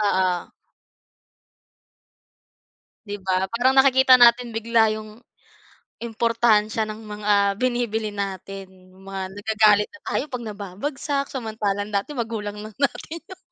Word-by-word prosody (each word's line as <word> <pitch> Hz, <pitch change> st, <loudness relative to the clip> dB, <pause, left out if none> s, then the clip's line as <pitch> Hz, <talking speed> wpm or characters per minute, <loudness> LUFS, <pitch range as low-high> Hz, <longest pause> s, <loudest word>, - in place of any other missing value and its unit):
Oo. 185 Hz, -3 st, 0 dB, 2.5 s
Di 205 Hz, 0 st, -5 dB
ba, 190 Hz, 0 st, -1 dB
parang 250 Hz, +3 st, +2 dB
nakikita 265 Hz, -1 st, +6 dB
natin 240 Hz, -1 st, +5 dB
bigla 225 Hz, 0 st, +3 dB
yung 215 Hz, 0 st, -9 dB, 0.8 s
importansiya 225 Hz, -2 st, +1 dB
ng 215 Hz, +1 st, -8 dB
mga 210 Hz, 0 st, -3 dB, 0.3 s
binibili 235 Hz, -4 st, -1 dB
natin, 195 Hz, -1 st, -6 dB, 0.2 s
yong 190 Hz, -, -19 dB
mga 195 Hz, -1 st, -4 dB, 0.2 s
nagagalit 210 Hz, -1 st, +3 dB
na 310 Hz, -, -15 dB
tayo -, -, -1 dB
'pag 240 Hz, -2 st, -4 dB
nababagsak. 220 Hz, +8 st, -4 dB
Samantalang 215 Hz, -5 st, -3 dB
dati 200 Hz, +9 st, -1 dB
magulang 215 Hz, -3 st, -4 dB
lang 215 Hz, 0 st, -9 dB
natin 290 Hz, +3 st, -2 dB
yung 375 Hz, +2 st, -13 dB
220 Hz, 115 wpm, -23 LUFS, 205-240 Hz, 2.5 s, nakikita